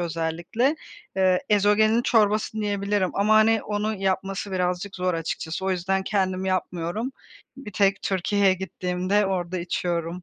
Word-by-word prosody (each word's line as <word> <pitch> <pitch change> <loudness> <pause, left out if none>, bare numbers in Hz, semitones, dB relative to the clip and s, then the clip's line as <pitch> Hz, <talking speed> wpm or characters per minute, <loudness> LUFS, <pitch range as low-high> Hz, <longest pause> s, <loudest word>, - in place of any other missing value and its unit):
özellikle. 170 - -1 0.4
Eee, 185 -1 +3
ezogelin 210 +2 +3
çorbası 215 -3 +2
diyebilirim 200 -2 0
ama, 210 +2 +3
hani, 220 0 +4
onu 210 +1 -2
yapması 195 0 -2
birazcık 180 +1 -2
zor 180 -1 0
açıkçası. 165 +1 -4
O 190 - +1
yüzden 190 +1 0
kendim 190 -1 -1
yapmıyorum. 185 +5 -2 0.4
Bir 265 -6 -9
tek 195 0 +2
Türkiye'ye 195 +1 +2
gittiğimde 185 +2 -1
orada 185 -1 -2
içiyorum. 175 0 -3
190 Hz, 130 wpm, -24 LUFS, 180-210 Hz, 0.4 s, hani